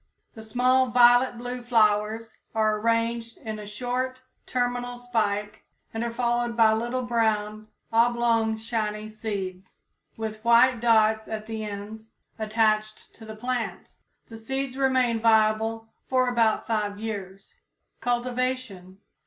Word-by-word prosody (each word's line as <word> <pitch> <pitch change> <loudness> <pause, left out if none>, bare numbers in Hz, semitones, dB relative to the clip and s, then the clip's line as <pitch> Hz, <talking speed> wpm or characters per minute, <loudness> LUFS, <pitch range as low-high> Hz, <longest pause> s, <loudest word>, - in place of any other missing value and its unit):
The 220 - -10
small 250 +4 +2
violet 245 +1 +5
blue 245 +1 -5
flowers 220 -1 +1 0.2
are 215 -1 +2
arranged 230 +1 -1
in 220 -1 -6
a 210 - -8
short, 250 +4 -3 0.3
terminal 245 0 -2
spike, 215 -3 -2 0.3
and 225 +1 -2
are 235 - -2
followed 240 0 -1
by 220 -1 +6
little 240 +3 -2
brown, 215 -3 -1 0.3
oblong, 230 -1 +2
shiny 215 -1 -3
seeds, 195 -4 -6 0.4
with 215 -1 -5
white 235 +1 +5
dots 220 -2 +3
at 215 -1 -5
the 220 -1 -5
ends, 215 +2 -8 0.3
attached 215 0 0
to 225 - -14
the 220 0 -8
plant. 245 +1 -4 0.4
The 225 -1 -10
seeds 265 +3 -3
remain 260 -4 +2
viable 220 0 +2 0.2
for 255 -1 +2
about 230 -3 +2
five 210 -2 -1
years. 195 -3 -7 0.5
_Cultivation. 245 -6 -2
225 Hz, 125 wpm, -26 LUFS, 215-245 Hz, 0.5 s, by